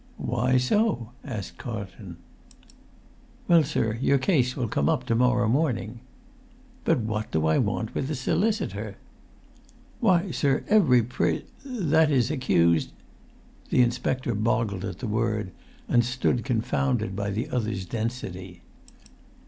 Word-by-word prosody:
"Why 125 Hz, +1 st, +1 dB
so?" 130 Hz, -, +1 dB
asked 110 Hz, -10 st, -6 dB
Carlton. 100 Hz, -6 st, -7 dB, 1.3 s
"Well, 170 Hz, -2 st, +6 dB
sir, 110 Hz, -5 st, -1 dB
your 140 Hz, -, +3 dB
case 130 Hz, -4 st, +1 dB
will 125 Hz, -4 st, -1 dB
come 70 Hz, -8 st, 0 dB
up 125 Hz, -, 0 dB
to 115 Hz, -, 0 dB
morrow 125 Hz, -1 st, +3 dB
morning." 120 Hz, -3 st, 0 dB, 0.9 s
"But 160 Hz, -7 st, +2 dB
what 110 Hz, -1 st, -3 dB
do 80 Hz, 0 st, 0 dB
I 80 Hz, 0 st, +3 dB
want -, -, -1 dB
with 130 Hz, -, -2 dB
a 155 Hz, -, -1 dB
solicitor?" 200 Hz, -, -1 dB, 1.0 s
"Why, 185 Hz, -5 st, +2 dB
sir, 135 Hz, 0 st, +1 dB
every 155 Hz, -, +5 dB
pris—that 160 Hz, -, 0 dB
is, 130 Hz, -2 st, +2 dB
accused——" 85 Hz, -, +2 dB, 0.8 s
The 125 Hz, -, +4 dB
inspector 120 Hz, +1 st, -1 dB
boggled 110 Hz, -2 st, 0 dB
at 95 Hz, -3 st, -5 dB
the 120 Hz, -, -5 dB
word, 105 Hz, -3 st, -1 dB, 0.4 s
and 120 Hz, -, +3 dB
stood 120 Hz, 0 st, 0 dB
confounded 120 Hz, -3 st, 0 dB
by 100 Hz, 0 st, -2 dB
the 110 Hz, +4 st, -3 dB
other's 110 Hz, -6 st, -2 dB
density. 95 Hz, -5 st, -5 dB
120 Hz, 125 wpm, -26 LUFS, 110-135 Hz, 1.3 s, Well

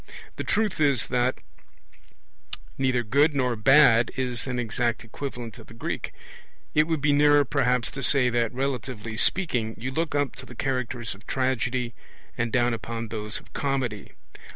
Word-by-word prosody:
The -, -, -3 dB
truth 210 Hz, -5 st, 0 dB
is 140 Hz, -6 st, +3 dB
that 125 Hz, +1 st, +1 dB, 1.4 s
neither 130 Hz, -2 st, +1 dB
'good' 140 Hz, +7 st, +3 dB
nor 125 Hz, -3 st, +1 dB
'bad' 125 Hz, 0 st, +6 dB
is 125 Hz, -1 st, -1 dB
an 125 Hz, -1 st, -2 dB
exact 120 Hz, 0 st, -1 dB
equivalent 120 Hz, -1 st, -7 dB
of -, -, -13 dB
the 115 Hz, -, -13 dB
Greek. 115 Hz, -, -4 dB, 0.6 s
It 155 Hz, +1 st, +4 dB
would 160 Hz, -3 st, -1 dB
be 145 Hz, 0 st, +3 dB
nearer 145 Hz, 0 st, +5 dB
perhaps 125 Hz, -4 st, +1 dB
to 135 Hz, -, -6 dB
say 135 Hz, -2 st, +6 dB
that, 120 Hz, -2 st, +1 dB
relatively 125 Hz, -4 st, -3 dB
speaking, 120 Hz, -, +1 dB
you 130 Hz, +3 st, -4 dB
look 160 Hz, +2 st, -2 dB
up 145 Hz, -2 st, 0 dB
to -, -, -9 dB
the 125 Hz, -, -11 dB
characters 125 Hz, -2 st, -2 dB
of 100 Hz, +3 st, -17 dB
tragedy, 130 Hz, -2 st, -1 dB, 0.4 s
and 120 Hz, -1 st, -1 dB
down 120 Hz, 0 st, +2 dB
upon 115 Hz, 0 st, -5 dB
those 105 Hz, -1 st, -2 dB
of -, -, -22 dB
comedy. 130 Hz, -7 st, -2 dB
125 Hz, 160 wpm, -26 LUFS, 115-140 Hz, 1.4 s, bad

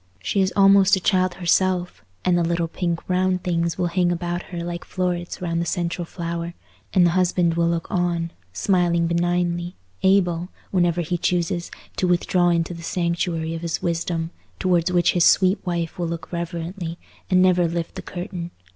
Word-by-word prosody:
She 195 Hz, -, +1 dB
is 190 Hz, 0 st, +2 dB
almost 195 Hz, 0 st, +6 dB
a -, -, -2 dB
child 185 Hz, -1 st, +2 dB
herself, 180 Hz, 0 st, +1 dB, 0.2 s
and 180 Hz, -, +4 dB
the 175 Hz, -, +2 dB
little 170 Hz, 0 st, 0 dB
pink 170 Hz, 0 st, -3 dB
round 185 Hz, 0 st, +1 dB
things 170 Hz, -1 st, 0 dB
will 180 Hz, -, 0 dB
hang 175 Hz, 0 st, +1 dB
about 175 Hz, 0 st, -2 dB
her 170 Hz, -2 st, -4 dB
like 175 Hz, 0 st, -4 dB
florets 180 Hz, -1 st, -3 dB
round 170 Hz, -1 st, 0 dB
the -, -, -1 dB
central 175 Hz, 0 st, -2 dB
flower; 170 Hz, 0 st, -5 dB, 0.4 s
and 180 Hz, -3 st, +5 dB
the 170 Hz, -, +4 dB
husband 180 Hz, -1 st, +2 dB
will 170 Hz, 0 st, +2 dB
look 170 Hz, -1 st, -1 dB
on, 170 Hz, -2 st, 0 dB, 0.2 s
smiling 175 Hz, -, +2 dB
benignly, 175 Hz, +1 st, 0 dB, 0.3 s
able, 180 Hz, -2 st, +2 dB, 0.2 s
whenever 175 Hz, -2 st, +2 dB
he 175 Hz, +1 st, -2 dB
chooses, 175 Hz, 0 st, 0 dB, 0.3 s
to 185 Hz, -, +1 dB
withdraw 175 Hz, 0 st, +2 dB
into 170 Hz, 0 st, +1 dB
the 170 Hz, -, -9 dB
sanctuary 170 Hz, -1 st, -1 dB
of 165 Hz, -, -5 dB
his 170 Hz, -1 st, -3 dB
wisdom, 170 Hz, -1 st, -1 dB, 0.3 s
towards 180 Hz, -1 st, +2 dB
which 175 Hz, -1 st, +3 dB
his 175 Hz, -, +3 dB
sweet 185 Hz, +3 st, +4 dB
wife 170 Hz, -1 st, -2 dB
will 170 Hz, -, 0 dB
look 165 Hz, 0 st, -6 dB
reverently, 170 Hz, 0 st, -4 dB, 0.3 s
and 185 Hz, -, +4 dB
never 180 Hz, -2 st, +4 dB
lift 170 Hz, 0 st, -3 dB
the -, -, -6 dB
curtain. 175 Hz, -1 st, -6 dB
175 Hz, 175 wpm, -23 LUFS, 170-180 Hz, 0.4 s, almost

